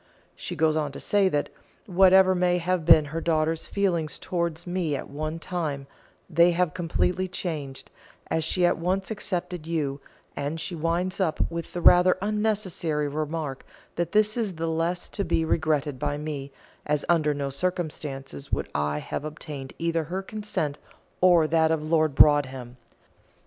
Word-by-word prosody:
She - - -5
goes 155 0 +2
on 150 -2 -1
to - - -7
say 200 -2 +2
that, 145 -4 -1 0.4
whatever 190 0 +5
may 180 -1 +2
have 175 -1 -1
been 160 -2 +7
her 165 - -2
daughter's 160 -1 0
feelings 175 -6 0
towards 170 -2 -2
me 175 -4 -1
at - - -6
one 155 +3 -4
time, 160 -5 -3 0.4
they 170 0 +5
have 180 -2 +1
completely 180 +1 0
changed, 155 -7 -5 0.3
as 160 - -1
she 180 +3 +2
at 175 - +2
once 190 +4 -1
accepted 180 -5 -4
you; 145 -4 -2 0.3
and 145 +3 -3
she 175 - -4
winds 170 +4 -1
up 170 -4 0
with 170 0 -5
the 175 - -3
rather 180 +1 +6
unnecessary 200 -7 -1
remark 150 -1 -3 0.3
that 170 -1 -2
this 215 0 +3
is 215 -7 -2
the 165 +1 -3
less 165 +2 -1
to 200 - -3
be 165 -2 +1
regretted 155 -4 0
by 145 0 -1
me, 145 -2 -5 0.3
as 150 -1 -1
under 160 -3 +3
no 140 -1 -3
circumstances 145 - -4
would - - -1
I 75 0 0
have 75 - -4
obtained 150 -3 -7
either 165 -1 -1
her 185 +5 -4
consent 200 -9 -3 0.4
or 175 -3 +6
that 160 0 +3
of 155 -1 -1
Lord 155 -3 +2
Broadhem. 130 -5 +3
165 Hz, 160 wpm, -26 LUFS, 150-180 Hz, 0.4 s, been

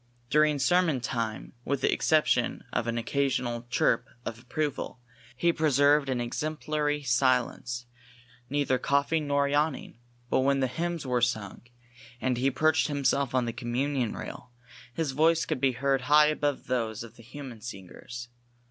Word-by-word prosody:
During 150 -1 +4
sermon 165 0 +3
time, 115 -2 -3
with 140 +1 -1
the - - +3
exception 155 -1 +2
of 115 - 0
an 115 0 -1
occasional 120 -1 -1
chirp - - +2 0.2
of 115 - -5
approval, 140 +2 -3 0.4
he 170 +4 +3
preserved 145 -2 +3
an 130 -2 0
exemplary 150 +3 -2
silence, 125 -1 +1 0.6
neither 140 -2 +1
coughing 140 +3 +1
nor 140 0 +2
yawning, 145 -3 -1 0.3
but - - +2
when 135 +1 +2
the 135 - +2
hymns 165 +4 -3
were 125 -1 0
sung, 110 -5 -1 0.6
and 130 -1 0
he 135 +2 +3
perched 155 +4 +2
himself 140 -2 0
on 125 -1 +2
the 115 - -3
communion 125 0 -1
rail, - - -8 0.4
his 150 +2 -2
voice 160 +4 +3
could 155 -5 -3
be 135 -2 +3
heard 135 +1 +1
high 150 +3 +5
above 145 -2 -1
those 115 -3 -2
of 115 -1 -12
the 120 - -14
human 125 -1 -9
singers. 120 +3 -8
135 Hz, 150 wpm, -28 LUFS, 120-150 Hz, 0.6 s, high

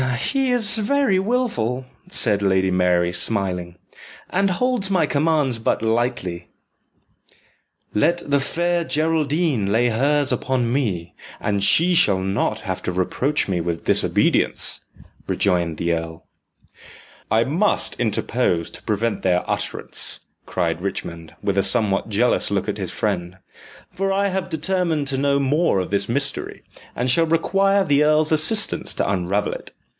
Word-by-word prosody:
"He 270 -1 +1
is 225 -3 +2
very 220 -3 +2
wilful," 190 - -1 0.2
said 105 - +2
Lady 95 -1 +2
Mary, 90 -1 +2
smiling, 90 -4 -2 0.6
"and 195 +1 +1
holds 230 +1 0
my 180 -5 +2
commands 145 -5 +1
but 110 - -1
lightly." 110 -7 -1 1.5
"Let 170 +12 +1
the 140 0 +2
Fair 170 +5 0
Geraldine 155 - 0
lay 120 +3 +2
hers 140 +5 +1
upon 125 -3 -1
me, 95 -11 -2 0.3
and 100 -2 -1
she 165 - +4
shall 100 - +4
not 95 +3 -1
have 95 -3 -4
to - - -2
reproach 125 +11 0
me 90 -3 -1
with 85 0 -3
disobedience," - - +2 0.5
rejoined 85 -4 0
the 85 0 0
earl. 80 0 -5 1.0
"I 110 +1 +3
must 170 - 0
interpose 110 -6 -1
to - - -10
prevent 110 +1 -1
their 90 -1 0
utterance," - - -4 0.3
cried 85 -2 -2
Richmond, 85 -4 -6
with 100 -1 0
a - - +2
somewhat 100 0 +2
jealous 115 +4 +1
look - - -1
at - - -3
his - - -4
friend, 90 +1 -3 0.6
"for 195 +1 -1
I 200 +1 +1
have 190 -1 -3
determined 165 -2 0
to 135 - -2
know 140 0 +2
more 140 - +1
of 90 - -4
this 100 +1 0
mystery, 140 +3 0 0.3
and 125 +1 +1
shall 165 +5 +3
require 195 +4 +2
the 145 -1 +3
earl's 155 +1 +3
assistance 160 +8 +2
to - - -1
unravel 100 +1 -1
it. - - -10
125 Hz, 140 wpm, -21 LUFS, -, 1.5 s, she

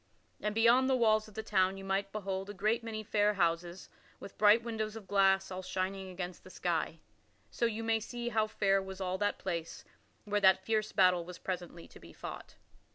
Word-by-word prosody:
And 210 0 -2
beyond 235 +4 +5
the 265 - +4
walls 215 -3 +3
of 215 - -16
the 220 - -4
town 190 -2 +1
you 195 - -8
might 195 +1 -1
behold 195 -2 -4
a 205 - -7
great 215 +5 0
many 220 -1 -5
fair 210 -1 +2
houses 170 0 -1 0.3
with 200 - -10
bright 215 +2 +5
windows 220 -2 -3
of 215 -4 -9
glass 195 -1 +3
all 185 0 -4
shining 190 +1 -3
against 180 -1 -6
the - - -13
sky. - - -2 0.5
So 235 - 0
you 225 0 -4
may 225 0 +2
see 240 +2 -5
how 220 -2 +1
fair 195 -2 +2
was 190 0 -8
all 185 0 -2
that 205 0 0
place, 170 -3 -5 0.4
where 205 0 0
that 190 -1 +5
fierce 215 -1 0
battle 180 -2 +4
was 175 +1 -9
presently 175 -2 -6
to - - -14
be 85 0 -14
fought. - - -8
195 Hz, 205 wpm, -32 LUFS, 185-215 Hz, 0.5 s, beyond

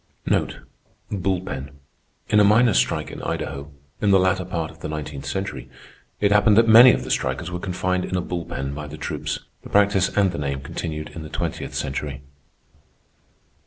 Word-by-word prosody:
Bull 95 -2 0
pen—in 70 +5 -4
a - - +7
miners' 105 - +5
strike 60 - -1
in - - -8
Idaho, 70 +2 -4 0.3
in 105 - +2
the 95 - +6
latter 95 0 +2
part 85 -3 -3
of 80 - -18
the - - -5
nineteenth 75 -2 -5
century, 95 +6 -4 0.5
it 100 -1 +2
happened 105 0 +5
that 115 0 +6
many 120 +3 +10
of 65 - -1
the 65 - -5
strikers 90 +6 -1
were 90 - -3
confined 90 0 -1
in - - -4
a 90 - +1
bull 85 -1 -4
pen 70 -4 -4
by 75 +1 -6
the 75 +2 -9
troops. - - -4 0.2
The - - -11
practice 100 -2 +3
and 100 -2 +2
the 85 - -5
name 70 -2 -2
continued 75 +2 -5
in 80 - -8
the 80 - -8
twentieth - - -4
century. 70 0 -3
90 Hz, 180 wpm, -23 LUFS, 75-100 Hz, 0.5 s, many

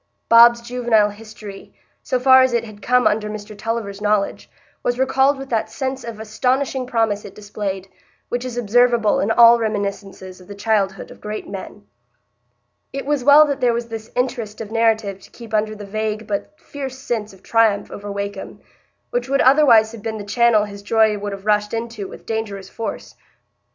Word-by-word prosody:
Bob's 235 +1 +7
juvenile 235 -3 +1
history, 210 -1 -12 0.3
so 255 - -1
far 260 +1 +7
as 260 -1 +2
it 235 -1 +1
had 215 -2 -12
come 250 0 +2
under 210 0 +1
Mr 210 0 -8
Tulliver's 210 -2 -4
knowledge, 210 -1 0 0.3
was 245 0 -1
recalled 265 +2 +2
with 270 0 -8
that 225 -2 -1
sense 265 -1 -4
of 230 -2 -7
astonishing 255 +4 -1
promise 225 -4 0
it 200 - -11
displayed, 200 -2 -5 0.4
which 245 0 -3
is 250 -2 -6
observable 240 -1 +3
in 200 - 0
all 235 +1 +7
reminiscences 200 -3 -4
of 180 - -16
the 205 - -9
childhood 200 -3 -1
of - - -15
great 210 0 -6
men. 200 +1 -9 1.1
It 275 - -5
was 290 -2 0
well 290 +3 +8
that 280 -2 -3
there 245 -1 +3
was 235 0 -4
this 225 -1 -7
interest 245 -4 -2
of 220 -2 -7
narrative 220 -3 +1
to - - -16
keep 230 -2 -13
under 215 0 0
the 205 -1 -9
vague 215 +1 -3
but 215 +9 -5
fierce 270 -2 -7
sense 225 -5 -3
of 190 - -19
triumph 225 -3 +2
over 205 0 -7
Wakem, 200 0 -6 0.5
which 245 +1 -2
would 275 +1 +2
otherwise 255 -6 +5
have 230 -2 -10
been 220 0 -4
the 205 - -6
channel 220 +1 +3
his 200 -1 -10
joy 220 0 +2
would 205 0 -4
have 195 0 -8
rushed 210 +1 +1
into 230 -3 -5
with - - -12
dangerous 205 -4 -4
force. 225 - -6
220 Hz, 185 wpm, -20 LUFS, 205-245 Hz, 1.1 s, well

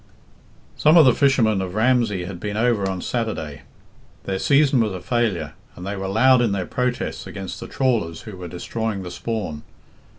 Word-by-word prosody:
Some 155 +3 +5
of 160 - +8
the 125 - +6
fishermen 115 -8 +3
of 95 0 -5
Ramsey 110 -5 +2
had 90 -1 -7
been 105 +2 -4
over 110 -4 +1
on 95 -1 -4
Saturday. 80 - -3 0.6
Their 95 -1 -3
season 140 0 +4
was 110 -4 +1
a 95 - -5
failure, 95 - -1 0.2
and 90 - -9
they 100 +1 -3
were 95 -1 -4
loud 125 +6 +4
in 115 -4 +1
their 95 -2 -2
protests 125 +3 -2
against 95 -2 -7
the - - -7
trawlers 115 -12 0
who 110 - -9
were 90 -1 -7
destroying 100 +4 -4
the 90 - -7
spawn. 105 -9 -4
105 Hz, 185 wpm, -22 LUFS, 95-120 Hz, 0.6 s, of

